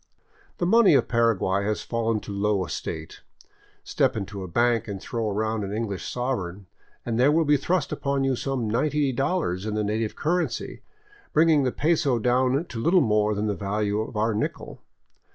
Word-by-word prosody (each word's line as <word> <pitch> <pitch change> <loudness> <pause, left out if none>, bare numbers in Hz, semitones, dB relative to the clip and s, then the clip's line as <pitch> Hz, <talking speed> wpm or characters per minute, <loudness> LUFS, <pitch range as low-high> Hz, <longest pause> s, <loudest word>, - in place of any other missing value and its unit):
The 175 - -1
money 205 -3 +5
of - - +3
Paraguay 110 -5 +1
has 105 +1 -2
fallen 115 -2 -1
to - - -8
low 100 -1 0
estate. 75 - -6 0.6
Step - - 0
into 100 -1 -5
a 95 - -5
bank 120 +5 +1
and 100 -2 -5
throw 110 +1 -3
down 110 -1 -1
an 100 - -4
English 105 -3 -3
sovereign, 105 -7 -3 0.4
and 115 -1 -1
there 135 +4 +5
will 160 +1 +3
be 145 0 +4
thrust 175 +6 0
upon 140 -1 -1
you 135 -1 +1
some 130 -2 -2
$90 135 - 0
in 105 0 -1
native 110 +1 -2
currency, 175 +3 -2 0.5
bringing 155 -1 +4
the 125 - +1
peso 150 -4 +1
down 125 +6 +1
to 120 - -7
little 175 +6 +4
more 105 -4 +2
than 105 +1 -1
the 105 - 0
value 105 +1 -1
of 110 0 -6
our 110 +1 +1
nickel. 105 - -4
115 Hz, 170 wpm, -25 LUFS, 105-135 Hz, 0.6 s, money